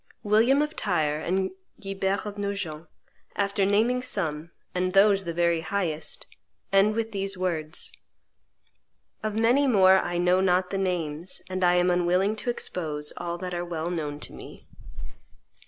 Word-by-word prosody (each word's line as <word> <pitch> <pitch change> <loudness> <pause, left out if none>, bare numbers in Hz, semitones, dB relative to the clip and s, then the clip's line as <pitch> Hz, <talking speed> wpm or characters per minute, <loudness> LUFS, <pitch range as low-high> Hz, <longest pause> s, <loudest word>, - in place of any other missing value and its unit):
William 230 +7 +4
of 300 +1 -5
Tyre 155 -6 0
and 190 +4 -1 0.3
Guibert 195 -1 -2
of 205 -1 -5
Nogent, 190 -6 -4 0.5
after 200 -1 +1
naming 230 +5 +2
some, 165 -10 -2 0.2
and 185 0 -1
those 195 -1 +5
the 170 - -2
very 170 -1 +2
highest, 165 -5 -2 0.5
end 200 +2 +4
with 225 0 -2
these 195 -2 -2
words: 165 -3 -3 1.3
"Of 215 -1 -3
many 240 +6 +3
more 190 -5 +6
I 175 -1 -2
know 180 +1 +3
not 180 -1 +2
the 195 - -1
names, 175 -2 -2
and 185 0 -2
I 175 0 +5
am 180 0 +3
unwilling 180 +4 +2
to 245 - -2
expose 155 -10 -2
all 170 0 -4
that 180 0 -5
are 175 0 -2
well 170 -1 -3
known 150 -4 -3
to - - -5
me." - - -12
185 Hz, 155 wpm, -26 LUFS, 170-200 Hz, 1.3 s, more